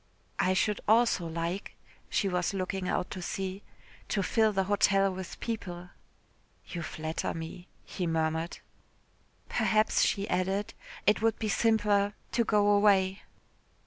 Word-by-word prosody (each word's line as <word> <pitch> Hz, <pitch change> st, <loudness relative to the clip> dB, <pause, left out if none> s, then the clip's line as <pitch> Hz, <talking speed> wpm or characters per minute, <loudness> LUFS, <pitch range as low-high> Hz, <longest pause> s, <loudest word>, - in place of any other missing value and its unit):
"I 185 Hz, -, +3 dB
should 210 Hz, +2 st, +1 dB
also 220 Hz, -5 st, +3 dB
like," 170 Hz, +4 st, -4 dB, 0.3 s
she 200 Hz, -, +1 dB
was 180 Hz, +1 st, 0 dB
looking 185 Hz, 0 st, -2 dB
out 180 Hz, -, -1 dB
to 185 Hz, -, -5 dB
sea, 190 Hz, +2 st, -4 dB, 0.5 s
"to 200 Hz, -, 0 dB
fill 220 Hz, +2 st, +3 dB
the 195 Hz, -1 st, +1 dB
hotel 195 Hz, 0 st, +3 dB
with 185 Hz, -1 st, -7 dB
people." 180 Hz, -6 st, -5 dB, 0.7 s
"You 170 Hz, -, -5 dB
flatter 155 Hz, 0 st, -3 dB
me," 165 Hz, +2 st, -7 dB, 0.2 s
he 180 Hz, -3 st, -3 dB
murmured. 160 Hz, +1 st, -1 dB, 0.9 s
"Perhaps," 215 Hz, 0 st, +2 dB
she 200 Hz, 0 st, +1 dB
added, 190 Hz, +3 st, -1 dB, 0.3 s
"it 210 Hz, +2 st, +3 dB
would 225 Hz, 0 st, +2 dB
be 220 Hz, -, -2 dB
simpler 205 Hz, -2 st, +2 dB, 0.2 s
to 235 Hz, -, +2 dB
go 210 Hz, -2 st, +3 dB
away." 200 Hz, -2 st, +4 dB
195 Hz, 135 wpm, -30 LUFS, 180-210 Hz, 0.9 s, away